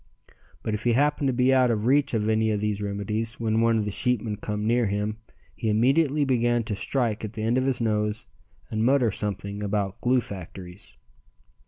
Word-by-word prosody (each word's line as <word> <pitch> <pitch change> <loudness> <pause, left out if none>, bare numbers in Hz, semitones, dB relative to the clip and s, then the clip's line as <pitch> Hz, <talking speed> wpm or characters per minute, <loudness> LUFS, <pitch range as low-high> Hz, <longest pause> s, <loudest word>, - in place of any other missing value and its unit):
But 110 - -2
if 105 0 -3
he 120 - +2
happened 145 +2 +2
to - - +2
be 125 +2 +3
out 130 -1 +4
of 110 -2 0
reach 140 0 +3
of 105 -1 0
any 110 0 +2
of 105 -1 0
these 105 -1 -2
remedies 105 +3 -3
when 110 -1 +1
one 115 0 +3
of 105 - 0
the 105 - -2
sheepmen 115 -2 0
come 105 0 -4
near 120 0 +2
him 105 +2 -2 0.4
he 115 - -2
immediately 140 +7 +3
began 120 -2 +1
to 110 -1 -4
strike 115 +1 -1
at 110 0 -5
the 110 -1 -5
end 115 +2 +1
of 130 +1 +1
his 135 - +1
nose 105 0 -1 0.5
and 110 0 0
mutter 125 -2 +3
something 100 0 -4
about 100 -1 -2
glue 125 +1 +3
factories. 95 -1 -10
110 Hz, 200 wpm, -25 LUFS, 105-125 Hz, 0.5 s, out